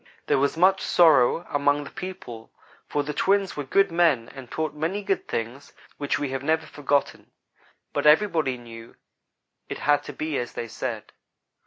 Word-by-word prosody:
"There - - +2
was 140 +3 0
much 190 +2 +4
sorrow 165 -1 +4
among 145 0 +1
the - - -10
people, 175 -12 -8 0.4
for 145 - -1
the 150 +1 -4
twins 195 +3 +1
were 145 - -3
good 195 +7 +2
men 165 -9 +2
and 135 -3 -11
taught 155 -2 -3
many 165 +7 -2
good 195 -1 -1
things 120 +5 -5 0.2
which 145 -1 -1
we 145 -2 -3
have 135 0 -3
never 160 +2 0
forgotten, 145 -1 -1 0.6
but - - +1
everybody 155 -5 +3
knew 115 -1 -12 0.7
it - - -4
had 145 0 +2
to 145 - -7
be 155 +1 -2
as 120 - -5
they 115 - -5
said. 115 -1 -5
145 Hz, 170 wpm, -25 LUFS, 130-165 Hz, 0.7 s, much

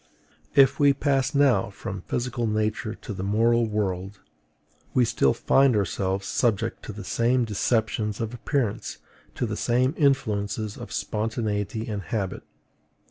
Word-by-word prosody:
If 135 -1 +5
we 145 -1 +6
pass 135 0 0
now 130 -9 +3
from 100 -1 -6
physical 120 +2 -2
nature 110 +1 -1
to 110 - -7
the 95 - -6
moral 115 +4 +2
world, 100 -2 -2 0.8
we 125 - +5
still 70 - +2
find 135 -3 +4
ourselves 95 0 -1
subject 115 -1 0
to - - -5
the - - -8
same 120 +1 +1
deceptions 110 -1 0
of 115 0 -3
appearance, 120 -2 -2 0.4
to - - -1
the 105 -2 -3
same 125 +5 +1
influences 110 -7 0
of - - -9
spontaneity 110 0 -2
and 105 -3 -3
habit. 95 +2 -3
110 Hz, 135 wpm, -25 LUFS, 105-125 Hz, 0.8 s, we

